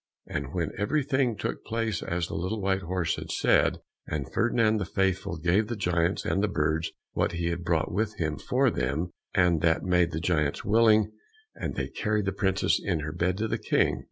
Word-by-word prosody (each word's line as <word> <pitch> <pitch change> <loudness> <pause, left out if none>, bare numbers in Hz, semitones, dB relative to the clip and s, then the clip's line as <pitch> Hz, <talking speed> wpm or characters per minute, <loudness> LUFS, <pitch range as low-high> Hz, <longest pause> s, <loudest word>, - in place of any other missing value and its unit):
And 70 - -3
now 85 -2 +1
everything 130 0 +1
took - - -3
place 115 -5 -2
as 85 0 -1
the - - -8
little 95 +6 -2
white 95 -1 0
horse 90 -1 -1
had - - -7
said, - - +2 0.3
and 70 -4 -4
Ferdinand 115 -2 +2
the 100 - -2
Faithful 95 -1 0
gave 90 +7 +2
the 120 - -3
giants 90 -2 0
and 95 - +1
the 105 - +2
birds 80 -3 0 0.2
what - - 0
he 85 0 -1
had 85 +1 -3
brought 85 -2 0
with 110 +2 -1
him 80 -7 -2
for - - +2
them, 70 +8 -1 0.2
and 90 -4 +3
that 80 -1 +2
made 90 -2 +3
the 80 - -3
giants 75 -4 0
willing, 110 -1 +4 0.4
and - - -4
they - - -2
carried 105 -2 -1
the 100 - 0
princess 95 0 +1
in 80 -3 0
her 75 +1 -4
bed 90 +2 0
to 110 +2 -1
the - - -2
King. - - +1
90 Hz, 200 wpm, -27 LUFS, 85-105 Hz, 0.4 s, willing